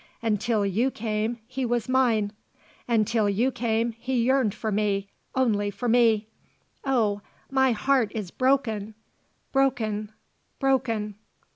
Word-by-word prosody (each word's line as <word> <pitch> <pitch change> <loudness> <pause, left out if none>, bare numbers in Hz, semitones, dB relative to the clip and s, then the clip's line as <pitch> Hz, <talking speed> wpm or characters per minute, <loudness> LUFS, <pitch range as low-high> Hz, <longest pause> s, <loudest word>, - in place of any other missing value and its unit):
Until 215 -1 +1
you 215 +7 +1
came 220 -1 -2
he 260 +2 -4
was 240 -2 0
mine. 235 -5 +2 0.5
Until 225 -2 +2
you 230 +7 +1
came 230 -1 0
he 245 +1 -1
yearned 260 -3 +3
for 220 0 -3
me 200 -1 0 0.2
only 215 -6 +2
for 205 +5 -4
me. 225 -2 +4 0.6
Oh, 220 -7 +1 0.3
my 265 -1 +4
heart 245 -1 +2
is 205 -5 -4
broken! 225 -6 0 0.6
broken! 220 -6 0 0.5
broken!" 230 -7 0
225 Hz, 120 wpm, -26 LUFS, 210-255 Hz, 0.6 s, me